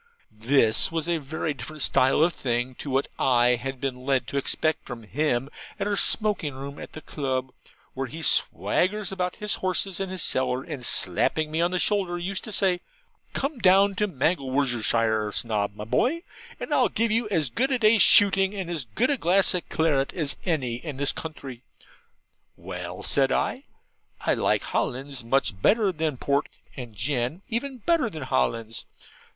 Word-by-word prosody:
This 115 +2 +2
was 165 0 -2
a 170 -1 0
very 155 +2 -3
different 155 +1 -5
style 135 +4 +3
of 170 +1 +2
thing 120 -1 -2
to 145 - -6
what 135 +1 0
I 120 -2 +4
had 125 +2 -1
been 125 -2 -4
led 135 -1 +1
to 140 - -3
expect 155 +3 0
from 120 -2 -7
him 130 +2 -1 0.3
at 200 - -1
our 205 0 0
smoking 200 - +1
room 140 +1 -8
at - - -10
the 155 - -9
Club: 130 -4 -3 0.4
where 135 0 -3
he 160 +5 -8
swaggers 195 +6 +1
about 180 -2 -2
his 210 0 0
horses 185 0 0
and 195 -1 -3
his 185 -3 0
cellar: 130 0 +2
and 145 -6 -7
slapping 150 - 0
me 160 +1 0
on 170 - +2
the 180 - -1
shoulder 185 -2 +1
used 185 +2 -4
to 220 - -6
say, 190 -3 +2 0.5
'Come 275 -1 -2
down 195 0 +5
to 210 +2 0
Mangelwurzelshire, 125 - 0
Snob 105 -2 -1
my 105 - -7
boy, 275 - 0 0.4
and - - -4
I'll - - +3
give 230 0 0
you 225 0 0
as 160 - 0
good 265 - 0
a 260 - +2
day's 220 -2 +4
shooting 195 0 +6
and 185 -3 -4
as 155 -7 -2
good 185 - 0
a 280 - +1
glass 190 0 +3
of 180 -2 -3
claret 150 -4 +1
as 150 -5 0
any 130 -9 -1
in 145 0 -7
the 140 - -1
county.' 135 -6 -7 1.0
'Well,' 90 0 -7
I - - -8
said, 135 -1 +2
'I 265 - -1 0.7
like - - +2
Hollands 135 0 -3
much 115 -5 0
better 210 - +3
than 155 -5 -2
port, 140 +3 0 0.3
and 120 -5 -9
gin 125 - -2
even 255 +3 -3
better 270 +1 +1
than 155 -8 -7
Hollands.' 115 -4 -1
150 Hz, 180 wpm, -25 LUFS, 125-190 Hz, 1.0 s, shooting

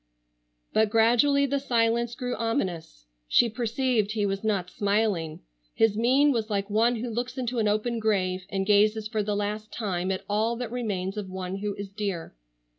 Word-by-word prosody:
But 220 -1 +3
gradually 240 +6 +4
the 280 +1 0
silence 235 -2 +1
grew 250 -1 -3
ominous. 180 - -3 0.2
She 235 - +4
perceived 230 -2 0
he 210 -2 0
was 195 0 -2
not 195 -5 -1
smiling. 200 -6 0 0.3
His 225 -2 +3
mien 260 +6 +4
was 225 -4 -1
like 200 -1 -2
one 230 +3 +3
who 235 +2 -4
looks 240 +4 -3
into 250 -1 -2
an 215 - +2
open 215 +3 0
grave, 185 -4 0
and 195 -1 -1
gazes 210 +1 +3
for 215 -1 -1
the 205 0 -1
last 210 +1 -3
time 185 -5 -2
at 190 - -4
all 220 +3 +1
that 240 -1 -5
remains 205 -5 -3
of 200 -3 -4
one 185 0 -4
who 205 0 -3
is 200 -1 -6
dear. 200 -5 -4
215 Hz, 180 wpm, -27 LUFS, 200-235 Hz, 0.3 s, gradually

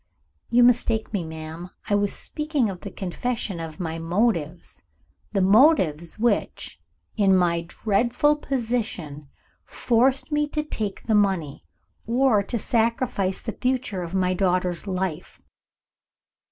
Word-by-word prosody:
"You 245 +1 +5
mistake 230 -2 +2
me, 195 -4 -1
madam. 160 +2 -8 0.2
I 210 - 0
was 205 0 +2
speaking 300 -8 -1
of 180 - -9
the - - -6
confession 200 0 -3
of 165 +1 -7
my 165 -2 -3
motives 170 -2 -1 0.5
the 195 -3 +1
motives 190 - +4
which, 235 +2 -1 0.4
in 195 -3 +4
my 170 -2 +1
dreadful 235 - +1
position, 220 - -3 0.3
forced 255 +5 +1
me 295 0 +1
to 300 +1 -2
take 215 -9 -4
the 225 - 0
money, 190 -9 +1 0.4
or 240 -2 +3
to 235 +4 -3
sacrifice 225 -4 0
the 225 - -3
future 250 -7 0
of 175 +1 -5
my 185 -1 +2
daughter's 180 0 0
life. 185 -3 -3
200 Hz, 125 wpm, -24 LUFS, 175-240 Hz, 0.5 s, You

